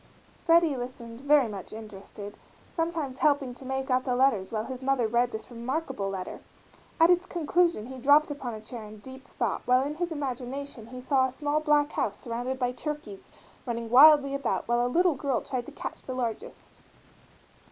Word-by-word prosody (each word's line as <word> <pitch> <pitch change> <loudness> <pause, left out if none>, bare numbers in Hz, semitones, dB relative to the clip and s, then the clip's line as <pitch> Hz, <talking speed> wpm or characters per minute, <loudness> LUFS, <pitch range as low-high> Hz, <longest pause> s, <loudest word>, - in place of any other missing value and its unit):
Freddie 330 -3 +3
listened, 245 -1 -7
very 285 -2 +4
much 200 -3 -8
interested, 205 -1 -9 0.4
sometimes 325 -6 -3
helping 285 -4 +2
to 255 - -11
make 265 0 -3
out 255 0 +2
the 250 -2 0
letters 245 -7 +2
while 215 -1 -1
his 260 -1 -7
mother 265 -2 +1
read 240 +2 +1
this 220 +3 -7
remarkable 245 -3 -3
letter. 190 -2 -5 0.6
At 330 +2 +7
its 355 +1 +2
conclusion 340 -6 +1
he 260 +1 -8
dropped 290 +4 +5
upon 255 -5 -5
a 215 - -9
chair 225 +1 -8
in 215 0 -10
deep 260 +5 -12
thought 235 -5 -2
while 250 +1 +4
in 290 - -3
his 345 +2 -3
imagination 270 -4 -5
he 250 +1 -9
saw 260 0 +2
a - - -7
small 290 +3 -1
black 295 -1 +2
house 205 - -1
surrounded 245 +2 -4
by 250 -1 0
turkeys 250 -6 -6 0.4
running 230 -1 -3
wildly 280 +1 +8
about 275 -4 -1
while 240 +1 +2
a - - +1
little 350 +5 +3
girl 275 -3 -1
tried 255 -3 -4
to - - -8
catch - - -7
the 255 - -6
largest. 255 - -5
260 Hz, 185 wpm, -28 LUFS, 235-290 Hz, 0.6 s, wildly